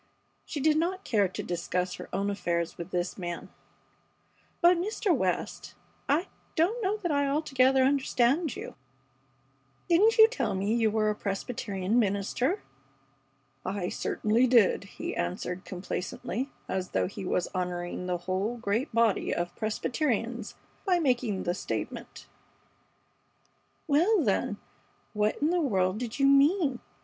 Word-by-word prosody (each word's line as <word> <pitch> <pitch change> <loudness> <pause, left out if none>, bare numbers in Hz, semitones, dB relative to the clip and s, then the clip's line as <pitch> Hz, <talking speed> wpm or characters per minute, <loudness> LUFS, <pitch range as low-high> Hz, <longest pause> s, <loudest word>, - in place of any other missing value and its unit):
She 300 - -4
did 305 +2 +3
not 370 +4 -1
care 205 -5 +3
to 185 - -6
discuss 180 +1 -2
her - - -8
own 200 +1 0
affairs 170 -4 -1
with 170 +1 -7
this 180 +2 -2
man. 175 -1 -5 1.1
"But, 350 +1 +6
Mr. 400 -1 +1
West, 185 -8 -2 0.3
I 305 +6 +3 0.3
don't 380 +9 +2
know 405 +1 0
that 355 -6 -2
I 285 -1 +2
altogether 270 -3 +3
understand 275 +1 +2
you. - - -7 1.1
Didn't 405 +7 +4
you 440 0 +10
tell 460 - -2
me 200 +3 0
that 235 - +1
you 220 - +4
were 215 0 +1
a - - -3
Presbyterian 200 0 -1
minister?" 225 - 0 1.0
"I 190 -1 -2
certainly 225 +4 +1
did," 235 -5 +4
he - - -6
answered, 180 - -3
complacently, 185 +6 -4 0.2
as 185 -1 -2
though - - +2
he 195 - -6
were 180 - +1
honoring 180 0 -3
the 180 -1 0
whole 190 +6 -2
great 230 +5 -1
body 230 -3 +2
of 175 0 -2
Presbyterians 230 0 -2 0.3
by 370 -3 +3
making 245 - 0
the 175 - 0
statement. 190 - -5 1.6
"Well, 340 +6 +3
then, - - 0 0.6
what 210 0 0
in 310 - +3
the 355 -1 +2
world 190 - +1
did 240 -2 -4
you 275 - +3
mean? 280 0 +4
230 Hz, 140 wpm, -29 LUFS, 190-295 Hz, 1.6 s, you